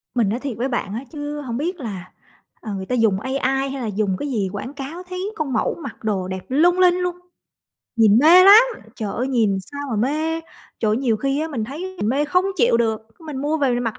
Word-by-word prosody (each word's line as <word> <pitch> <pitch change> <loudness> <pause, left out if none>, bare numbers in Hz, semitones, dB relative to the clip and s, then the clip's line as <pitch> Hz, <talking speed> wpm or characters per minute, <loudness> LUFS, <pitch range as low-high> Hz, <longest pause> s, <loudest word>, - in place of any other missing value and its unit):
Mình 225 -5 +2
nói 235 +4 -1
thiệt 260 -6 -5
với 250 +3 -1
bạn 225 -5 -3
á 235 +5 -4
chứ 295 -1 -5
hổng 240 -3 -4
biết 345 +4 -3
là, 195 -7 -7 0.5
ờ, 215 -2 -5
người 190 -1 -4
ta 250 - -1
dùng 215 -5 +2
AI 265 +4 -3 0.3
hay 270 -1 -5
là 230 - -3
dùng 200 -2 -1
cái 290 - -3
gì 200 -5 -1
quảng 250 +7 -5
cáo, 295 +6 -7
thấy 370 +3 -4
con 285 -5 -3
mẫu - - 0
mặc - - -9
đồ 195 -4 -1
đẹp 190 0 -6
lung 350 +7 +3
linh 360 -1 +5
luôn, 360 -1 -2 0.8
nhìn 220 -1 +5
mê 345 +6 +8
lắm! 415 +4 +10 0.3
Trời 210 -3 -3
ơi, 255 +3 -1
nhìn 220 -7 +2
sao 285 - -5
mà 220 - -1
mê, 310 +8 0 0.4
trời 215 - +2
ơi, 215 - +2
nhiều 240 -4 +1
khi 275 +5 -1
á 320 - -2
mình 235 -8 -3
thấy 360 +9 -7
mình 210 - -1
mê 280 +4 +1
không 360 +5 +2
chịu 240 -4 +4
được, 225 -2 0 0.2
mình 305 -4 -7
mua 295 +4 0
về 275 -4 +1
mình 245 - -1
mặc 225 - -3
260 Hz, 245 wpm, -21 LUFS, 220-310 Hz, 0.8 s, lắm